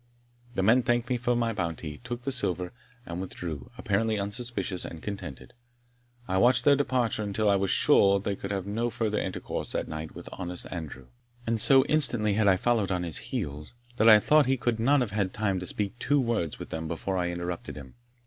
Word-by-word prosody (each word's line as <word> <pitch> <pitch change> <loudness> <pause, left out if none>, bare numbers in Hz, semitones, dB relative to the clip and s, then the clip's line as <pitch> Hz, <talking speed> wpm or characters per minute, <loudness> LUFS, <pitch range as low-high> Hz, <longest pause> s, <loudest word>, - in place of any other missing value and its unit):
The 95 - 0
men 115 +6 +5
thanked 120 0 0
me 125 - +2
for 120 0 0
my 115 -1 0
bounty, 85 -5 -4
took 120 0 -6
the 135 - -2
silver, 90 -8 -1 0.3
and 85 +1 -5
withdrew, 80 -7 -6
apparently 110 +2 0
unsuspicious 100 -2 -3
and 80 - -7
contented. 80 -9 -7 0.7
I 95 0 +1
watched 120 +3 +4
their 145 - +7
departure 125 -6 0
until 105 +1 -1
I 100 - +5
was 95 0 0
sure 100 +1 +4
they 100 0 -2
could 100 - -7
have 100 -2 -3
no 115 +4 -1
further 110 -2 -1
intercourse 95 - -4
that - - -2
night 80 0 -6
with - - -10
honest 90 0 -6
Andrew. 80 -7 -7 0.4
And 115 -1 +1
so 135 +2 +7
instantly 120 -9 +2
had 105 0 +2
I 95 -2 +5
followed 115 -1 +1
on 90 -1 -1
his 85 -2 -1
heels, 75 +9 -5 0.2
that 115 0 +6
I 110 - +10
thought 150 +4 +4
he 135 0 +2
could 120 -2 -1
not 135 +4 +3
have 115 -5 -2
had 100 -2 -1
time 100 -3 0
to 90 - -4
speak 105 +5 0
two 145 +3 +2
words 115 - -1
with - - -9
them 80 0 -4
before 85 +4 -3
I 90 -1 0
interrupted 85 0 -5
him. 70 -3 -10
100 Hz, 205 wpm, -28 LUFS, 90-120 Hz, 0.7 s, I